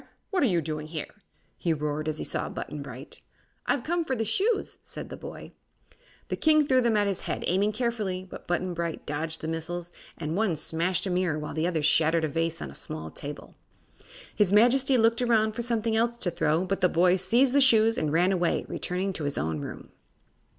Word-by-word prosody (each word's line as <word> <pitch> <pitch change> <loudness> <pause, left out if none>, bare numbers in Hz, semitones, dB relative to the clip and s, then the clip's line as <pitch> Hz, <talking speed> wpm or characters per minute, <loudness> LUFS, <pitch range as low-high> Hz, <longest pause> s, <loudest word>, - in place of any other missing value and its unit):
What 385 - +1
are 275 - +4
you 175 -6 +1
doing 155 0 -4
here?" 155 -2 -6 0.5
he 170 - +1
roared, 150 0 -2
as 155 -1 -1
he - - -3
saw - - -2
Button 150 -1 -6
Bright. 135 0 -9 0.5
"I've 270 - +1
come 340 +3 0
for 265 -4 -2
the 225 -2 -1
shoes," 405 - 0
said - - -8
the - - -6
boy. - - -9 0.8
The - - -1
king 310 -1 +4
threw 260 -2 +4
them 235 -3 +2
at 205 - +3
his 200 -2 -1
head, - - -4
aiming 200 +4 +2
carefully, 210 -6 -2
but - - -11
Button 175 +1 -1
Bright 170 -1 -4
dodged 155 +2 -3
the 160 - -4
missiles 170 +2 -4 0.3
and 155 0 -3
one 200 -4 +1
smashed 170 +4 0
a 190 - -1
mirror 180 -4 +1
while 150 0 -5
the 160 +3 0
other 165 -4 -1
shattered 160 +2 +3
a - - +2
vase 165 +2 -1
on 70 - -7
a - - -12
small 80 +2 -7
table. 145 +1 -8 0.8
His 205 -3 +3
Majesty 250 +5 +5
looked 230 +1 +3
around 220 -3 +3
for 220 - -4
something 230 -2 0
else 235 +1 +1
to 180 -6 -1
throw, 160 +3 +1
but 195 +1 -2
the 180 - +4
boy 180 +2 +4
seized 235 +8 +3
the 280 - +5
shoes 225 -3 +5
and 155 -8 -1
ran 175 +4 +3
away, 180 -3 +1
returning 185 +2 -2
to 155 - -4
his 145 - -2
own 80 +1 -1
room. - - -8
180 Hz, 215 wpm, -27 LUFS, 160-225 Hz, 0.8 s, Majesty